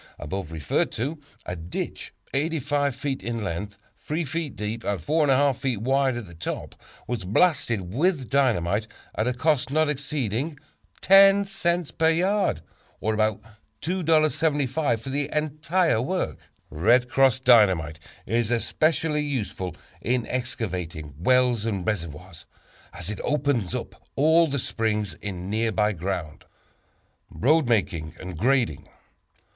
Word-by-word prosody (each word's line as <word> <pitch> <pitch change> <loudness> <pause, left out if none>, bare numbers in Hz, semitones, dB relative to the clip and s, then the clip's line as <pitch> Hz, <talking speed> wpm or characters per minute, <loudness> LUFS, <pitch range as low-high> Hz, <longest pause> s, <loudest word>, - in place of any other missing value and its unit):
above 80 +2 -5
referred 80 -4 0
to, 145 +8 -3 0.3
a 90 - -4
ditch 85 +1 -5 0.2
85 145 -2 0
feet 135 -1 -3
in 115 -2 -3
length, 100 +3 -4 0.2
3 160 +3 -2
feet 155 -1 -4
deep 105 +2 -4
and 100 -2 -1
4 150 - +1
1/2 140 0 +4
feet 130 -3 -2
wide 135 +2 +1
at 120 - -5
the 85 - -13
top, 80 - -5 0.3
was 120 -5 -3
blasted 105 - +1
with 150 - +1
dynamite, 110 -7 +1 0.3
at 110 - -1
a 125 - +1
cost 145 0 +1
not 155 +2 +2
exceeding 145 -1 -2 0.4
10 195 +1 +7
cents 175 -4 -1
per 160 0 +2
yard, 190 +5 +1 0.4
or 110 - 0
about 110 -1 0 0.4
$2.75 155 -6 +1
for 135 +4 -7
the 145 +1 -1
entire 155 -1 +1
work. 130 - -2 0.3
"Red 120 +11 +3
Cross" 130 0 +3
Dynamite 95 - +4 0.3
is 115 -1 0
especially 150 +5 +1
useful 110 - -3 0.3
in 120 0 0
excavating 90 - -4
wells 125 +2 +3
and 100 -5 -2
reservoirs, 85 -3 -5 0.4
as 90 +4 -6
it 105 - -6
opens 140 - 0
up - - -6
all 160 +4 +5
the 140 -1 -2
springs 110 -4 -1
in 95 -3 -5
nearby 110 -1 +1
ground. 85 -3 -4 0.8
Road 150 +1 +2
Making 90 -8 0
and 90 -1 -7
Grading. 110 - +1
125 Hz, 130 wpm, -25 LUFS, 100-150 Hz, 0.8 s, 10